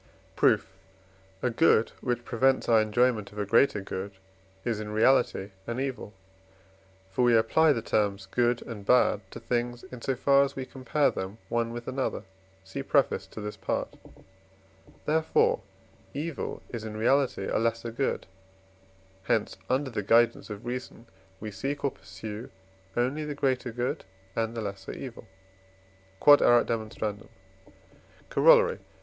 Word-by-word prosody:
Proof. 95 - +3 0.7
A 125 - +2
good 115 -3 +4
which 120 -1 -2
prevents 130 +3 +2
our 115 -2 +5
enjoyment 110 0 +1
of 105 - -14
a 105 - -1
greater 110 0 +3
good 95 +1 -5 0.5
is 115 -3 -1
in 105 -1 -5
reality 110 -2 +2 0.2
an 120 +2 -3
evil; 130 -5 -4 1.0
for 125 - -1
we 120 -1 +5
apply 160 +8 +4
the 115 -6 -1
terms 100 -2 0
good 120 +4 +1
and 110 -4 -8
bad 105 -2 +4
to 115 - -9
things, 120 +1 -2
in 125 -2 -8
so 135 - -1
far 140 +2 +4
as 140 0 -3
we 130 - -4
compare 135 +3 0
them 95 +3 -5
one 115 0 0
with 120 0 -7
another 130 -5 -2 0.4
(see 95 0 -6
preface - - +1
to 110 - -9
this 105 0 -5
Part); - - -3 1.1
therefore, 445 - +2 0.5
evil 155 +1 -4
is 115 -3 -5
in 110 -1 -6
reality 130 +4 +2
a - - 0
lesser 115 +1 -1
good; 135 +4 -1 1.0
hence 105 +2 +1
under 130 +1 0
the 110 - -2
guidance 115 +3 +3
of 105 +2 -7
reason 120 -1 -6 0.3
we 110 0 -6
seek 135 +8 -4
or 140 - +2
pursue 105 +4 -8 0.5
only 130 +6 0
the 150 -1 -4
greater 130 -3 0
good 120 +2 -2 0.3
and 115 0 -1
the - - -2
lesser 100 -2 -6
evil. 125 -4 -8 0.9
Q.E.D. 115 -6 +3 1.0
Corollary. - - +5
120 Hz, 145 wpm, -28 LUFS, 110-130 Hz, 1.1 s, our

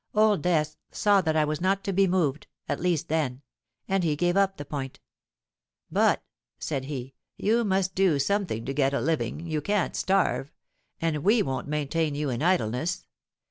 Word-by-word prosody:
Old 210 -5 +4
Death 155 -3 +1
saw 205 -2 +3
that 160 -3 0
I 155 -1 +3
was 155 +2 -3
not 195 +2 +1
to 195 - -2
be 195 +1 +4
moved—at 160 -6 -2
least 175 -4 0
then; 145 -4 -1 0.4
and 195 -1 +1
he 155 -3 +1
gave 175 +3 +1
up 195 -1 +2
the 145 - -6
point. 135 -2 -5 0.9
'But,' - - +3 0.3
said 135 -4 -3
he, 135 -2 -6 0.2
'you 230 +3 +2
must 190 -2 +1
do 185 -5 +3
something 140 - -1
to 135 - -3
get 140 -1 +1
a - - +1
living: 160 +1 -1
you 155 -2 -2
can't 205 +3 0
starve; 190 -7 +1 0.5
and 165 -2 0
we 210 +3 +4
won't 135 0 -3
maintain 150 +1 -1
you 145 -2 -1
in 120 +1 -3
idleness. 165 -2 0
160 Hz, 175 wpm, -27 LUFS, 145-190 Hz, 0.9 s, Old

